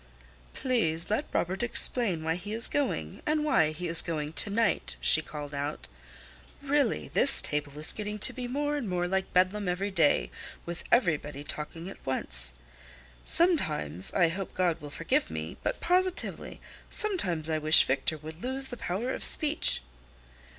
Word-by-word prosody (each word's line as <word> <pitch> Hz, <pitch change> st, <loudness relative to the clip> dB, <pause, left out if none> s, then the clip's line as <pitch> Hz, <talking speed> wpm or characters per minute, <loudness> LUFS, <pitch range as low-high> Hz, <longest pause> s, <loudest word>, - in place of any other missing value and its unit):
"Please 190 Hz, -10 st, 0 dB
let 220 Hz, +8 st, -1 dB
Robert 185 Hz, +4 st, -2 dB
explain 230 Hz, -7 st, 0 dB
why 160 Hz, 0 st, -1 dB
he 190 Hz, +5 st, -7 dB
is 230 Hz, +1 st, +4 dB
going, 290 Hz, -1 st, -3 dB
and 305 Hz, -2 st, -1 dB
why 160 Hz, -, +2 dB
he 175 Hz, +3 st, -6 dB
is 165 Hz, 0 st, +4 dB
going 155 Hz, -2 st, -5 dB
to 205 Hz, -, +5 dB
night," 225 Hz, +3 st, -1 dB
she 155 Hz, -, +5 dB
called 150 Hz, -2 st, -9 dB
out. 145 Hz, +2 st, -5 dB, 0.7 s
"Really, 285 Hz, -3 st, -1 dB
this 275 Hz, -, +7 dB
table 145 Hz, -1 st, -2 dB
is 155 Hz, -, 0 dB
getting 210 Hz, 0 st, -5 dB
to 210 Hz, -, -1 dB
be 250 Hz, -1 st, -6 dB
more 290 Hz, +3 st, -2 dB
and 240 Hz, -8 st, -5 dB
more 175 Hz, -1 st, -1 dB
like 190 Hz, +1 st, -2 dB
Bedlam 185 Hz, +2 st, +1 dB
every 195 Hz, +3 st, -3 dB
day, 150 Hz, -, +1 dB, 0.3 s
with 170 Hz, 0 st, -7 dB
everybody 150 Hz, -, 0 dB
talking 155 Hz, +3 st, -6 dB
at 195 Hz, -, -11 dB
once. -, -, -2 dB, 0.7 s
Sometimes—I 165 Hz, -, +3 dB
hope 190 Hz, +3 st, -6 dB
God 175 Hz, -3 st, -1 dB
will 145 Hz, -, -9 dB
forgive -, -, -2 dB
me—but 80 Hz, +1 st, -5 dB
positively, 365 Hz, +1 st, -1 dB, 0.3 s
sometimes 190 Hz, -, +2 dB
I 160 Hz, -1 st, -1 dB
wish 155 Hz, +1 st, +5 dB
Victor 140 Hz, +4 st, -1 dB
would 155 Hz, +3 st, -11 dB
lose 265 Hz, +1 st, +3 dB
the 245 Hz, -, -7 dB
power 225 Hz, +9 st, -3 dB
of -, -, -6 dB
speech." 310 Hz, 0 st, +4 dB
180 Hz, 155 wpm, -28 LUFS, 155-245 Hz, 0.7 s, this